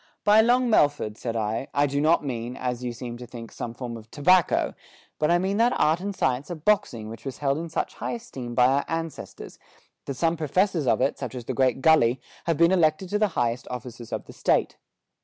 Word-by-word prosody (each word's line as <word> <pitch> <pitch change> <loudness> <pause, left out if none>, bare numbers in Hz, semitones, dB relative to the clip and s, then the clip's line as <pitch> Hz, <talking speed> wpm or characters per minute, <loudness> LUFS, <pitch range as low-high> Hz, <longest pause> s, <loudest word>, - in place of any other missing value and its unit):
"By 210 +1 +6
Long 245 +2 +3
Melford," 145 - +2
said 115 +1 -4
I, 110 +3 -2
"I 145 +1 +4
do 140 0 -1
not 155 0 +3
mean, 120 -2 -4
as 125 -1 -3
you 125 - -2
seem 120 0 -7
to 125 0 -9
think, 115 -1 -9
some 115 -1 -6
form 120 -2 -6
of 110 -1 -14
tobacco, 180 +6 +3 0.5
but 150 - +2
I 175 - +5
mean 190 +3 -1
that 235 +2 +2
art 160 +2 +3
and 200 +1 -4
science 130 -1 0
of 170 -3 -7
boxing 120 - +1
which 110 +1 -9
was 130 -4 -6
held 140 +2 0
in 165 0 -5
such 160 - -2
high - - -4
esteem 135 - -7
by 125 - +5
our 135 +2 +2
ancestors, 165 -1 -6 0.5
that 140 - -4
some 165 +5 +1
famous 155 -2 -4
professors 180 -3 +1
of - - +2
it, 140 - 0
such 130 -1 -5
as 120 -2 -6
the 130 - -3
great 130 0 +1
Gully, 130 -5 +4 0.3
have 165 -3 +1
been 170 +1 +5
elected 170 0 +2
to 210 +2 0
the 215 - +3
highest 120 0 0
offices 120 -2 -8
of - - -4
the - - -12
State. - - +1
140 Hz, 230 wpm, -25 LUFS, 120-170 Hz, 0.5 s, By